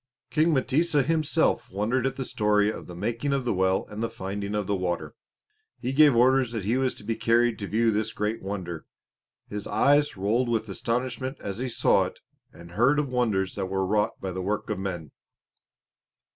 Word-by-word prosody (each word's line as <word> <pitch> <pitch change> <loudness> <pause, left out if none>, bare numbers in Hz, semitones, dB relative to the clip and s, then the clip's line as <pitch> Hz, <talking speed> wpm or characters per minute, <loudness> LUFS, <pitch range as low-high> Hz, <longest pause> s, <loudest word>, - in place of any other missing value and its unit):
King 160 +2 +3
M'tesa 145 +3 +2
himself 160 +2 +1
wondered 115 +7 0
at 135 - -3
the 130 - -4
story 105 -2 +2
of - - -9
the 90 - -9
making 115 +9 -2
of 135 -2 -1
the 120 - +1
well 95 0 +1
and 105 +1 -7
the 115 - -1
finding 100 -1 -4
of 105 -1 -1
the 100 - 0
water. 90 -2 -3 0.7
He 130 +2 -3
gave 145 -2 +6
orders 125 0 +4
that 110 -5 -3
he 115 +4 +1
was 130 -1 0
to - - -13
be 115 - -2
carried 115 0 +2
to 100 - -4
view 115 +2 +2
this 110 +1 -1
great 105 +2 -2
wonder. 90 -4 -5 0.6
His 105 -1 -5
eyes 145 +5 +3
rolled 115 +6 +1
with 110 -1 0
astonishment 125 +6 -2
as 100 +2 -5
he 130 0 -2
saw 120 +1 +3
it - - -8 0.3
and 85 0 -13
heard 120 +10 +3
of 145 -3 -1
the - - -4
wonders 100 -6 +1
that 95 -2 -3
were 95 0 -1
wrought 105 +2 0
by 95 - -4
the 95 +1 -4
work 105 +3 -2
of 105 - -2
men. 90 -6 -5
110 Hz, 200 wpm, -26 LUFS, 100-130 Hz, 0.7 s, gave